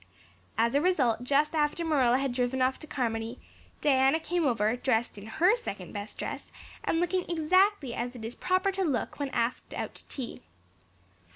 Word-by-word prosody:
As 230 +1 +3
a 285 - +3
result 265 -10 +2
just 285 +4 +2
after 305 +2 +1
Marilla 260 -6 +3
had 270 -2 -1
driven 250 +1 0
off 260 +1 +2
to 310 - -10
Carmody, 230 -3 -2 0.4
Diana 270 +1 +4
came 335 -1 0
over, 225 -2 +2
dressed 240 -2 0
in 205 +1 -9
her 355 - +4
second 200 - -6
best 205 +1 -6
dress - - -5 0.3
and 330 - +1
looking 355 +1 0
exactly 345 - +3
as 245 +2 -3
it 225 -2 -7
is 230 - -4
proper 370 +5 +1
to 385 0 -1
look 280 -4 -1
when 285 -1 -1
asked 235 -1 -2
out - - -4
to - - -7
tea. 255 -4 -6
270 Hz, 180 wpm, -29 LUFS, 240-325 Hz, 0.4 s, Diana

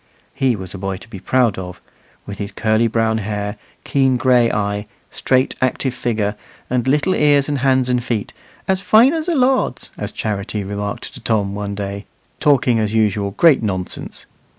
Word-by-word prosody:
He 135 -3 +1
was 95 -3 -8
a 100 - -7
boy 95 0 -3
to 110 - -14
be 105 -4 -9
proud 120 -2 +1
of, 90 -1 -7 0.5
with 100 -1 -8
his 100 -1 -4
curly 110 +1 +1
brown 115 0 +1
hair, 105 -1 -3 0.3
keen 135 -2 +2
gray 125 -2 +3
eye, 105 0 -2 0.2
straight 130 0 +1
active 130 0 0
figure, 110 -4 -1 0.4
and 125 0 0
little 150 +7 +2
ears 145 -4 +3
and 145 -2 -1
hands 130 -1 +2
and 125 -1 +1
feet, 115 -4 -3 0.3
"as 190 0 +1
fine 225 - +5
as 320 0 -2
a 345 - +1
lord's," 260 -1 +1
as - - -4
Charity 105 0 -3
remarked 100 +1 -5
to - - -10
Tom 105 -3 0
one 100 0 -4
day, 100 0 -5 0.3
talking, 130 -5 +3
as 110 0 -1
usual, 105 -2 +1
great 165 -5 +5
nonsense. 95 -4 -4
115 Hz, 175 wpm, -19 LUFS, 100-130 Hz, 0.5 s, fine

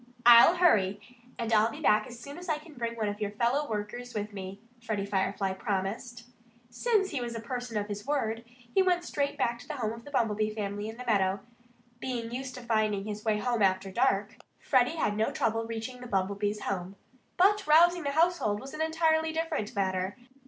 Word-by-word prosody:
"I'll 240 +8 +9
hurry. 205 - +3 0.4
And 230 -1 -2
I'll 215 +1 +5
be - - -8
back 215 +2 +3
as 245 -1 -10
soon 285 +6 -9
as 355 0 -9
I 310 - +2
can 305 +1 -14
bring 235 -3 -3
one 220 -2 -1
of 205 +1 -4
your 205 - 0
fellow 240 +8 0
workers 225 +3 -5
with 210 0 -3
me," 195 0 -7 0.2
Freddie 215 -3 -2
Firefly 195 0 -1
promised. 215 +5 -3 0.5
Since 400 - +1
he 275 - -2
was 235 -1 -4
a - - -3
person 245 -1 -4
of 205 - -1
his 205 +2 -6
word, 230 -6 -1 0.3
he 385 - +5
went 360 -2 +2
straight 285 -4 -2
back 235 0 0
to - - -13
the 305 - -4
home 225 -5 -2
of 230 0 -10
the 285 - -11
Bumblebee 215 -5 0
family 205 0 -3
in 225 - -9
the 250 - -8
meadow. 195 -3 +1 0.6
Being 240 -3 -4
used 255 +1 -5
to 250 - -8
finding 215 -4 0
his 210 0 -5
way 215 -2 +1
about 240 0 0
after 190 0 +2
dark, 220 -2 +1 0.2
Freddie 255 +4 +2
had 210 -10 0
no 215 +1 +1
trouble 225 0 -1
reaching 230 +2 -5
the 250 - -7
Bumblebees' 200 +1 -1
home. 190 0 -3 0.4
But 405 +2 +4
rousing 345 +3 +6
the 285 - -2
household 315 -9 +2
was 270 +4 -9
an 310 - -4
entirely 320 0 +2
different 320 - -2
matter. 190 +1 -1
230 Hz, 205 wpm, -29 LUFS, 205-280 Hz, 0.6 s, I'll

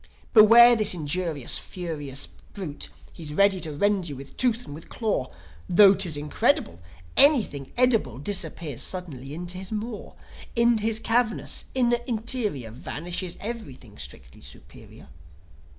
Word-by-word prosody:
"Beware 235 +2 +8
this 215 -4 +4
injurious, 155 -3 -2
furious 150 -7 -5 0.3
brute; 150 - -5 0.2
He's 150 -2 -8
ready 200 0 +3
to 160 -3 -3
rend 190 +3 0
you 145 - -6
with 135 +1 -11
tooth 245 -1 0
and - - -9
with 160 +3 -11
claw. 210 - -2 0.4
Tho' 195 +2 +7
'tis 170 -6 +1
incredible, 220 - 0 0.4
Anything 225 - +3
edible 225 - +2
Disappears 160 - -3
suddenly 145 -8 -4
into 175 +2 -5
his 190 +2 -7
maw: 220 0 -5 0.4
Into 235 -1 +3
his 225 -1 +1
cavernous 225 0 0
inner 240 -2 +2
interior 220 - -2
Vanishes 170 - -5
evrything 140 - -8
strictly 65 0 -9
superior." - - -13
185 Hz, 130 wpm, -25 LUFS, 145-225 Hz, 0.4 s, Beware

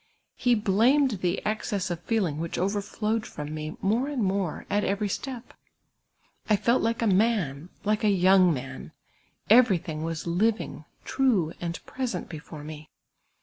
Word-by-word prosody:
He 245 -1 +3
blamed 225 +3 +3
the 180 +1 -1
excess 205 -3 -1
of 170 - -3
feeling 180 -6 -1
which 165 0 -3
overflowed 210 +3 -1
from 150 +1 -6
me 155 0 -5
more 225 +7 +1
and 280 -6 -1
more 190 -4 -1
at 205 0 +1
every 200 +1 0
step. 250 +4 -5 1.0
I 210 - +6
felt 235 +4 +2
like 230 +1 0
a - - +2
man, 185 -7 +1
like 210 +1 0
a 215 - +4
young 185 -1 +5
man; 130 -2 -6 0.5
everything 190 -9 +4
was 165 -1 -4
living, 210 +6 0 0.2
true, 215 -12 +1
and 170 -1 -3
present 245 -9 -4
before 155 -1 -9
me. 155 0 -9
195 Hz, 150 wpm, -27 LUFS, 165-225 Hz, 1.0 s, I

